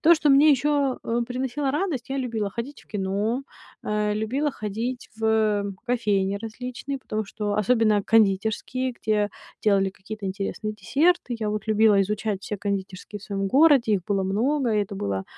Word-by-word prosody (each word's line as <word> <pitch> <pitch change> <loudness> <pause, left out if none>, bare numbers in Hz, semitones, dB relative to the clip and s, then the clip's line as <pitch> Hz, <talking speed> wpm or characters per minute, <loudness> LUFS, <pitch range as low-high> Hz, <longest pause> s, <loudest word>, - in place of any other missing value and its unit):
То, 340 +2 +7
что 300 -2 +2
мне 285 +3 +7
еще, 285 -1 +2
э, 235 +1 0
приносило 265 +2 -2
радость, 295 -6 -2
я 270 - -2
любила 230 -6 -2
ходить 240 +7 -6
в - - -26
кино, 205 +5 -1 0.4
э, 210 0 0
любила 255 +8 0
ходить 230 +2 -4
в, 225 - -11
э, 215 -2 +2 0.2
кофейни 205 -5 +1
различные, 250 +5 -5
потому 215 -4 -3
что 210 -1 -3
особенно 215 -1 +3
кондитерские, 220 +5 +1
где 210 -3 0 0.3
делали 195 -2 +3
какие-то 205 +2 -9
интересные 200 +2 -3
десерты. 265 - +1
Я 215 -2 -1
вот 215 +1 -3
любила 215 -2 +4
изучать 205 0 -1
все 210 - -4
кондитерские 195 -1 -4
в - - -16
своем 195 -1 -2
городе, 275 -4 +5
их 185 -3 -2
было 200 -2 0
много, 235 +7 +1
и 210 - +3
это 200 0 -7
было 100 - -2
220 Hz, 170 wpm, -25 LUFS, 205-255 Hz, 0.4 s, То